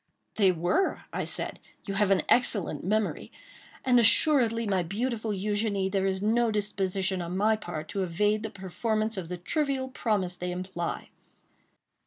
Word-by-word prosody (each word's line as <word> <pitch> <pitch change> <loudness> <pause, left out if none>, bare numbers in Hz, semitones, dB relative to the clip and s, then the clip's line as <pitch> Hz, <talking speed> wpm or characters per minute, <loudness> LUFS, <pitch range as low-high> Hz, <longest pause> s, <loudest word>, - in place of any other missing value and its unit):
"They 195 -3 +5
were," 175 - 0
I - - -2
said; - - -3 0.3
"you 195 - -4
have 200 0 +2
an 195 - +3
excellent 200 - +1
memory; 210 +3 -1 0.5
and 250 -2 +5
assuredly, 230 -1 +4
my 195 -3 +1
beautiful 220 +5 -3
Eugénie, 205 -1 -1
there 195 -1 +1
is 190 0 -1
no 230 +2 +2
disposition 195 -3 0
on 175 +2 -4
my 215 +2 +3
part 175 -7 -6
to 195 - -2
evade 205 +4 +1
the 220 - -4
performance 215 +3 -2
of 180 -4 -5
the 180 - -4
trivial 270 - -1
promise 205 -8 -1
they 180 0 -4
imply. 180 -1 -4
205 Hz, 155 wpm, -28 LUFS, 185-220 Hz, 0.5 s, They